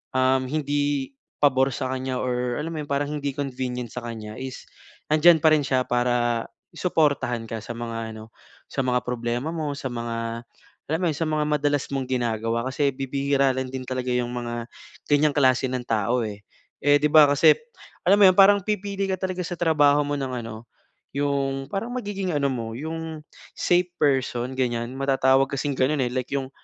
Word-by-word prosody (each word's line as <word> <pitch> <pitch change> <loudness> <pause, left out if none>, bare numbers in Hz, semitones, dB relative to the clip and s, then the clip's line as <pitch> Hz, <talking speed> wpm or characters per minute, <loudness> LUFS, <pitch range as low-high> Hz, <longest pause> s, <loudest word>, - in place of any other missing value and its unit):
um, 130 0 +3
hindi 145 -2 -1 0.3
pabor 135 -2 +3
sa 130 +1 -3
kanya 130 -1 -3
or, 125 0 -1
alam 165 +2 -4
mo 155 - -3
'yon, 145 - -12
parang 140 +1 +1
hindi 145 -2 -2
convenient 125 -3 -3
sa 125 - -6
kanya 110 -2 -7
is 130 -1 -7 0.5
nandiyan 160 +2 +6
pa 155 +1 +4
rin 150 - +1
siya 130 -2 0
para 120 -1 +1 0.3
suportahan 145 -9 0
ka 110 -1 -5
sa - - -7
mga 115 -1 -5
ano, 110 +1 -11 0.4
sa 135 - -2
mga 125 -1 +2
problema 120 +3 -2
mo, 155 -3 -3
sa 135 - -4
mga, 115 -1 -4 0.5
alam 160 +2 0
mo 180 - +1
'yon, - - -5
sa 165 - -1
mga 155 -1 0
madalas 145 -1 +1
mong 135 -2 -2
ginagawa. 115 -2 -1
Kasi 140 +2 +1
bibihira 135 0 +1
rin, 130 0 -3
din 130 -1 -5
talaga 130 -1 -3
'yong 125 -1 0
mga, 120 -1 -4 0.4
ganyang 145 0 +4
klase 130 -2 +3
ng 130 -1 -2
tao 115 +3 +1
eh, 105 -1 -7 0.4
eh, 145 +1 +5
'di 150 - +4
ba 155 -1 +9
kasi, 145 - +6 0.5
alam 200 +3 +5
mo - - +9
'yon, 185 - +1
parang 200 +1 +7
pipili 200 -1 -2
ka 190 - +1
talaga 185 -1 -2
sa 175 +1 -4
trabaho 150 -3 +4
mo 145 - -2
ng 135 -1 -3 0.2
ano, 115 0 -9 0.5
'yong 140 -1 -1
parang 205 +4 -3
magiging 200 -6 -3
ano 140 -1 +2
mo, 115 -3 -4
'yong, 160 +1 -5 0.3
safe 180 0 +2
person, 130 -3 +1
ganyan. 120 -1 -1
Matatawag 135 0 +3
kasing 140 0 -1
gano'n 135 +1 +2
eh, 120 - -3
like 130 -1 -2
'yong, 135 -2 -2
135 Hz, 185 wpm, -24 LUFS, 125-150 Hz, 0.5 s, ba